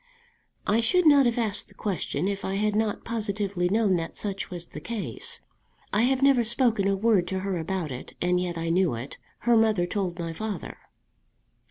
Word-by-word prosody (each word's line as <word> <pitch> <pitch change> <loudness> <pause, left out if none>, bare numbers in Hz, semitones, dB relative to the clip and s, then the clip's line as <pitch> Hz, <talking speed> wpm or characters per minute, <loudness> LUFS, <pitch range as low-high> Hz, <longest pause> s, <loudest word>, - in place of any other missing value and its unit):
"I 215 +2 +3
should 360 +10 +3
not 285 -4 +7
have 235 - 0
asked 215 -4 -1
the - - -20
question 185 -3 -2
if 200 0 -3
I 190 - -2
had 210 +1 +1
not 215 -1 -1
positively 200 -5 -1
known 205 -2 +3
that 165 -1 -5
such 200 -2 -2
was 175 -2 -6
the - - -7
case. 470 - -5 0.5
I 210 - +3
have 265 +1 +1
never 275 -3 +5
spoken 230 -3 +2
a 195 - +2
word 200 -4 +3
to 190 +1 -2
her 190 -2 -2
about 165 -2 -3
it, 125 - -7
and 180 0 +2
yet 175 -1 -2
I 165 0 -2
knew 175 -5 +2
it. 120 +4 -7 0.2
Her 240 -1 +4
mother 220 -5 +3
told 180 -2 -2
my 165 -2 -4
father." 215 +4 -5
200 Hz, 195 wpm, -26 LUFS, 180-225 Hz, 0.5 s, not